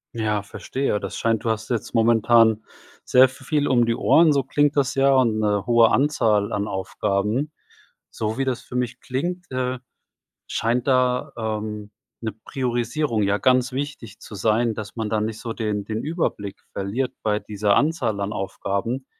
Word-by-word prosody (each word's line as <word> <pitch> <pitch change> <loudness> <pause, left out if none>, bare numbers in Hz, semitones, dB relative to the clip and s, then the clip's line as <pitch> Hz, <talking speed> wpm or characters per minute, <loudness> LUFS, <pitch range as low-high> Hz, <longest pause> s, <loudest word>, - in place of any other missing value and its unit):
Ja, 105 -2 -1
verstehe. 130 +1 -2
Das - - -6
scheint, 115 0 0
du - - +1
hast 110 +1 -2
jetzt 120 -3 -3
momentan 115 -1 +4 0.4
sehr 130 0 +6
v 130 - -14
viel 150 -2 +1
um 120 -2 +4
die 115 0 +1
Ohren, 160 -2 +5
so 140 -2 +1
klingt 145 +2 +1
das 140 -2 +1
ja 135 0 +4
und 115 -4 +3
'ne 105 -2 0
hohe 120 -2 +5
Anzahl 115 -8 +2
an 105 0 -1
Aufgaben. 105 +8 -1 0.6
So 110 +2 -3
wie 135 - +1
das 130 -1 -2
für 125 - -11
mich 125 -1 -2
klingt, 175 +7 -4
äh, 130 0 -2 0.7
scheint 120 +3 0
da, 125 -1 +2
ähm, 105 -1 -4 0.3
'ne 110 -3 -3
Priorisierung 120 -1 -1
ja 100 +1 +1
ganz 130 +3 +3
wichtig 135 -5 -5
zu 105 - -11
sein, 110 +3 +1
dass 110 +2 -7
man 110 -1 -2
da 110 -1 0
nicht 110 0 -3
so 115 -2 -4
den 105 -3 -2
den 110 +1 -4
Überblick 150 - -3
verliert 110 +7 -2
bei 105 -1 +1
dieser 105 -1 0
Anzahl 145 -9 +1
an 100 +1 -2
Aufgaben. 100 +6 -3
115 Hz, 170 wpm, -23 LUFS, 105-130 Hz, 0.7 s, sehr